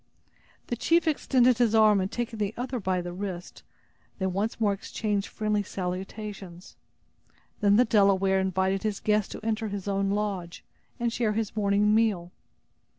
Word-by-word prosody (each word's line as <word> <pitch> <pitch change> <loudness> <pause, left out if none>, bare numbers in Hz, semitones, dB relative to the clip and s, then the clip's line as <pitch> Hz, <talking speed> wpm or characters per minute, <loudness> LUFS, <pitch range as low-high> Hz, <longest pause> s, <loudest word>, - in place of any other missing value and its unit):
The 240 - -3
chief 330 +7 +2
extended 255 -5 +3
his 230 -2 +3
arm 215 -2 +5
and 185 - -3
taking 235 -2 -4
the 210 +1 -2
other 250 +1 -3
by 185 -3 -1
the 175 0 -6
wrist, 185 -2 -6 0.6
they 190 - -2
once 195 +5 -2
more 210 -3 +2
exchanged 205 0 -2
friendly 210 -1 -1
salutations. 190 0 -6 0.8
Then 205 -1 +4
the 245 +4 +5
Delaware 195 -3 +3
invited 190 0 0
his 215 -2 -2
guest 210 -1 +1
to 215 - -9
enter 220 0 -1
his 200 -1 -5
own 195 0 0
lodge, 200 -4 -3 0.4
and 235 -1 0
share 225 -3 0
his 220 0 -2
morning 205 0 +2
meal. 210 -6 +1
205 Hz, 155 wpm, -27 LUFS, 190-220 Hz, 0.8 s, arm